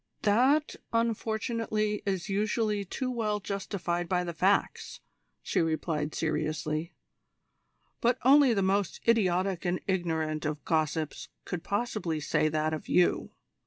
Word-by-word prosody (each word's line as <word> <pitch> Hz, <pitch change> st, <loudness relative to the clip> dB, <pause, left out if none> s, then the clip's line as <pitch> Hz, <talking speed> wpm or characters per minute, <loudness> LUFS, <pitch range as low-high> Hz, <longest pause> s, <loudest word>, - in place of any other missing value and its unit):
"That, 260 Hz, +9 st, +3 dB
unfortunately, 220 Hz, -2 st, -1 dB
is 190 Hz, -2 st, -1 dB
usually 210 Hz, +1 st, 0 dB
too 255 Hz, +7 st, -3 dB
well 215 Hz, -4 st, -1 dB
justified 190 Hz, -3 st, -3 dB
by 180 Hz, -1 st, +1 dB
the 170 Hz, -1 st, -4 dB
facts," 190 Hz, +5 st, 0 dB, 0.4 s
she -, -, +1 dB
replied 155 Hz, -2 st, -1 dB
seriously. 155 Hz, +1 st, -2 dB, 1.0 s
"But 240 Hz, +1 st, +2 dB
only 270 Hz, -2 st, +6 dB
the 195 Hz, -, +1 dB
most 195 Hz, 0 st, 0 dB
idiotic 190 Hz, -5 st, +2 dB
and 180 Hz, 0 st, 0 dB
ignorant 160 Hz, -5 st, -1 dB
of 150 Hz, -1 st, -3 dB
gossips 155 Hz, -1 st, -1 dB, 0.2 s
could 175 Hz, -2 st, -4 dB
possibly 205 Hz, -7 st, -2 dB
say 155 Hz, +1 st, +1 dB
that 155 Hz, +1 st, 0 dB
of 155 Hz, -, -6 dB
you. 180 Hz, -, +3 dB
190 Hz, 125 wpm, -29 LUFS, 160-215 Hz, 1.0 s, only